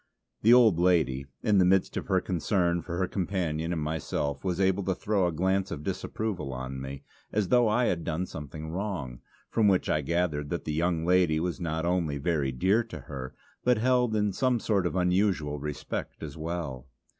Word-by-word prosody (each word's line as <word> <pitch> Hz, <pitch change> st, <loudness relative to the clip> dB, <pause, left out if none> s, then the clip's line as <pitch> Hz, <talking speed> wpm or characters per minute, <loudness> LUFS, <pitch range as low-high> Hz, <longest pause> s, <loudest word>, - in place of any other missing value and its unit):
The 115 Hz, -, +5 dB
old 115 Hz, -8 st, +6 dB
lady, 80 Hz, -7 st, +2 dB, 0.2 s
in 105 Hz, -3 st, +4 dB
the -, -, +6 dB
midst 95 Hz, +1 st, +3 dB
of -, -, -3 dB
her -, -, +3 dB
concern 85 Hz, 0 st, 0 dB
for 85 Hz, 0 st, -5 dB
her 95 Hz, 0 st, +1 dB
companion 85 Hz, -4 st, -2 dB
and 80 Hz, -3 st, -1 dB
herself, 70 Hz, -3 st, -2 dB
was 90 Hz, -1 st, -1 dB
able 95 Hz, 0 st, +2 dB
to 95 Hz, -, 0 dB
throw 100 Hz, -1 st, +1 dB
a -, -, 0 dB
glance 95 Hz, +4 st, 0 dB
of 75 Hz, -, -5 dB
disapproval 95 Hz, -7 st, -3 dB
on 65 Hz, +1 st, -5 dB
me, 70 Hz, +1 st, -7 dB, 0.3 s
as 105 Hz, -3 st, 0 dB
though 120 Hz, -2 st, +5 dB
I 115 Hz, +4 st, +2 dB
had 85 Hz, -6 st, 0 dB
done 85 Hz, +2 st, -2 dB
something 75 Hz, 0 st, -7 dB
wrong; 85 Hz, -, -4 dB, 0.3 s
from 110 Hz, -2 st, +3 dB
which 95 Hz, -2 st, +2 dB
I 75 Hz, -, +2 dB
gathered 75 Hz, -2 st, -1 dB
that 85 Hz, -, -3 dB
the 75 Hz, -, -2 dB
younger 85 Hz, +1 st, 0 dB
lady 90 Hz, -3 st, +3 dB
was 90 Hz, +2 st, -2 dB
not 80 Hz, -1 st, -2 dB
only 85 Hz, -5 st, 0 dB
very 75 Hz, -3 st, 0 dB
dear 95 Hz, -, +2 dB
to 115 Hz, -, -8 dB
her, 65 Hz, -5 st, -7 dB, 0.3 s
but 125 Hz, -1 st, +4 dB
held 125 Hz, -1 st, +2 dB
in 105 Hz, -2 st, +1 dB
some 125 Hz, +2 st, +1 dB
sort 100 Hz, -5 st, +1 dB
of 85 Hz, -, -4 dB
unusual 90 Hz, -5 st, +1 dB
respect 75 Hz, +2 st, -5 dB
as 75 Hz, -3 st, -6 dB
well. 80 Hz, -6 st, -4 dB
85 Hz, 195 wpm, -28 LUFS, 75-95 Hz, 0.3 s, old